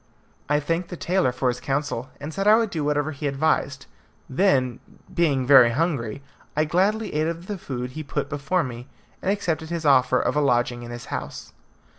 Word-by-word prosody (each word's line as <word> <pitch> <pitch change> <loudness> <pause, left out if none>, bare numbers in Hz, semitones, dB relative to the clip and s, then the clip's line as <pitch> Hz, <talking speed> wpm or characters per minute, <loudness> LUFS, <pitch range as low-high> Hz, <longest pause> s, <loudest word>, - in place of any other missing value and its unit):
I 150 0 +3
thanked 165 +4 -2
the 175 - -6
tailor 180 -7 +1
for 125 +1 -1
his 125 0 -2
counsel, 135 -3 -2
and 145 +3 -6
said 195 +4 -1
I 215 +1 +8
would 225 -3 0
do 160 -3 -2
whatever 145 +1 0
he 145 0 -4
advised; 140 -1 0 0.4
then, 130 -6 +2 0.3
being 145 -7 +2
very 130 -3 +8
hungry, 140 -3 -1 0.3
I 155 - +3
gladly 200 +7 +1
ate 155 +1 +1
of 170 +1 -4
the 205 - -4
food 125 -5 -5
he 155 - -6
put 145 -1 -3
before 150 +5 0
me, 125 -2 -7 0.3
and - - -1
accepted 165 -6 -1
his 170 -2 -3
offer 130 -2 +4
of - - 0
a 150 - +3
lodging 120 -3 +1
in 120 - -8
his 120 0 -7
house. - - -6
145 Hz, 195 wpm, -24 LUFS, 130-170 Hz, 0.4 s, I